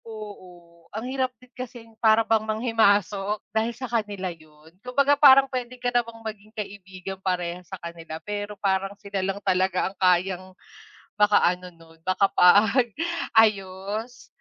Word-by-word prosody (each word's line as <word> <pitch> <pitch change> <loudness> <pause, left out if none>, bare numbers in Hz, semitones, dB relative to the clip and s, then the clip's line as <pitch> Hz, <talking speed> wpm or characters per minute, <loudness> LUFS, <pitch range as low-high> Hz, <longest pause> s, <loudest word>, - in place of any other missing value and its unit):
Oo, 180 -6 -12
ang 220 +3 -6
hirap 260 0 -1
din 250 +2 -22
kasing 240 -3 -9
para 220 0 +5
bang 225 -1 +2
manghimasok, 210 -3 +1 0.2
dahil 220 +2 0
sa 265 - -5
kanila 205 -6 -3
'yun. 155 0 -20
Kumbaga 275 +4 +2
parang 275 -2 +7
puwede 255 -2 -5
ka 245 0 -2
namang 230 -2 -2
maging 215 -1 -7
kaibigan 190 -2 -7
parehas 180 -2 -3
sa 190 - -6
kanila 170 -2 -8
pero 205 0 -5
parang 195 0 -1
sila 200 -1 -4
lang 195 +1 -2
talaga 185 -1 +1
ang - - -39
kayang 185 0 +2 0.8
makaano 180 -3 +3
nun, 165 0 -19
makapag-ayos. 210 - +2
205 Hz, 135 wpm, -25 LUFS, 185-230 Hz, 0.8 s, parang